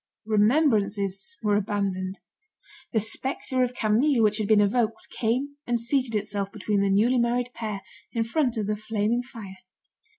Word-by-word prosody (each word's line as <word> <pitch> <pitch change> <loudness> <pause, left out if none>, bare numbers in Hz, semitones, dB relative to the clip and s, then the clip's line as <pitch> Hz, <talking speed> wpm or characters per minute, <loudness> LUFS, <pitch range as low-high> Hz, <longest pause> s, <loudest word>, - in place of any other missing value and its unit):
Remembrances 215 - +2
were 210 -1 +3
abandoned. 195 -2 -2 0.7
The 220 - +2
spectre 260 +4 -1
of 250 0 0
Camille 230 +4 +3
which 210 0 +2
had 210 - -1
been 215 -1 +5
evoked, 220 +2 0
came 260 +5 -1
and 240 -1 +1
seated 240 0 0
itself 200 -1 -2
between 205 -2 -1
the 200 - +2
newly 230 +6 +3
married 245 +1 0
pair, 215 -4 -5 0.3
in 230 - 0
front 245 0 0
of 215 - -1
the 210 +1 0
flaming 215 +2 -1
fire. 225 -7 -10
220 Hz, 155 wpm, -26 LUFS, 205-245 Hz, 0.7 s, been